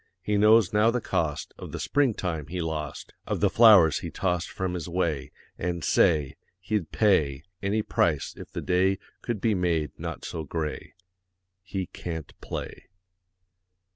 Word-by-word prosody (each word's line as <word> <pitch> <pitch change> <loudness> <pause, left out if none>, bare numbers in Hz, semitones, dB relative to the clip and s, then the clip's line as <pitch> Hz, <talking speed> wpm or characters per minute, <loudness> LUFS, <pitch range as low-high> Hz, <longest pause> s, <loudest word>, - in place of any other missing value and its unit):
He 105 +2 0
knows 105 -1 +5
now 105 +2 +4
the 125 +1 +1
cost 80 -9 -2
Of - - -8
the - - -5
spring 140 -6 +1
time 80 -6 -3
he 90 +3 -4
lost, 80 -3 -4
Of - - -1
the - - +2
flowers 100 -10 +7
he - - -5
tossed 90 -3 -1
From 95 -1 -3
his 90 -1 -4
way, 85 -6 -1 0.3
And, 85 -1 -2
say, 75 -5 +2 0.2
He'd 95 -1 -2
pay 75 -10 +2 0.2
Any 105 +2 0
price 80 -8 0
if - - -10
the - - -5
day 95 +2 +2 0.2
Could 120 -4 -3
be 110 +2 +2
made 85 -6 0
not - - -5
so 80 - -4
gray. 75 +1 -4 0.8
_He 95 -2 -2
can't 80 -4 -6
play. - - -6
90 Hz, 160 wpm, -27 LUFS, 80-105 Hz, 0.8 s, flowers